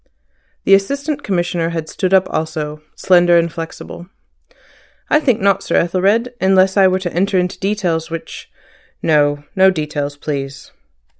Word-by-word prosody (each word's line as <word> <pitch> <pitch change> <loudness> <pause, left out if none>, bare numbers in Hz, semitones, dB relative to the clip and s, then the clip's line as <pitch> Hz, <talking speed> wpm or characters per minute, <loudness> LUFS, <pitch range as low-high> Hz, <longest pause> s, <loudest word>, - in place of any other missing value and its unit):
The 195 - +4
Assistant 280 +9 +1
Commissioner 175 -5 -1
had 165 -2 -4
stood 185 +2 -2
up 190 -1 +4
also, 155 -1 -4
slender 175 -2 +4
and 170 -1 0
flexible. 165 +1 -8 1.0
"I 300 - +5
think 255 -7 +1
not, 195 -1 +2
Sir - - -2
Ethelred, 200 +8 +1
unless 190 0 +3
I 195 -2 +5
were 185 0 +1
to 185 -2 -5
enter 195 +2 +1
into 180 0 -1
details 185 -5 -1
which—" 165 0 -8 0.5
"No. 145 -2 +2
No 190 0 +5
details, 150 -4 -3
please." 140 -2 -5
180 Hz, 145 wpm, -17 LUFS, 160-195 Hz, 1.0 s, I